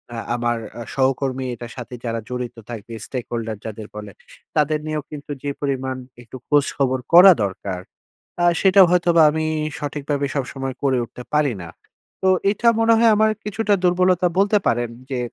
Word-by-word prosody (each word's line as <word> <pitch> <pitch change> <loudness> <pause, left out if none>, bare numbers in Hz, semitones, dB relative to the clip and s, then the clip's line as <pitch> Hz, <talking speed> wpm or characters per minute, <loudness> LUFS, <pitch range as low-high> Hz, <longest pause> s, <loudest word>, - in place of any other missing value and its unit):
আ - - -5 0.2
আমার 120 0 0 0.2
আ - - -5
সহকর্মী 130 0 0
এটার 120 +1 -9
সাথে 125 0 -8
যারা 115 0 -2
জড়িত 125 -1 -4
থাকবে, 115 -1 -8
stakeholder 115 -3 -4
যাদের 110 -1 -7
বলে, 105 -1 -7 0.4
তাদের 150 0 +2
নিয়েও 155 -1 -3
কিন্তু 145 -1 -8
যে 145 - -2
পরিমাণ 130 -2 -2 0.2
একটু 120 +2 -10
খোঁজ-খবর 140 -3 +1
করা 180 +3 +10
দরকার, 95 -1 -4 0.6
আ - - +3 0.2
সেটা 195 0 +5
হয়তোবা 170 -2 +4
আমি 155 +1 -2 0.3
সঠিকভাবে 145 -1 -2
সবসময় 135 -1 -3
করে 135 -2 +2
উঠতে 125 +1 -11
পারি 150 -5 +2
না। 85 - -8 0.5
তো 190 - +3 0.2
এইটা 225 +3 +1
মনে 225 0 +4
হয় 230 0 +5
আমার 215 +1 +4
কিছুটা 210 0 0
দুর্বলতা 180 0 +3
বলতে 200 +2 +4
পারেন 120 0 +1 0.2
যে, 130 - -2
140 Hz, 160 wpm, -21 LUFS, 120-170 Hz, 0.6 s, করা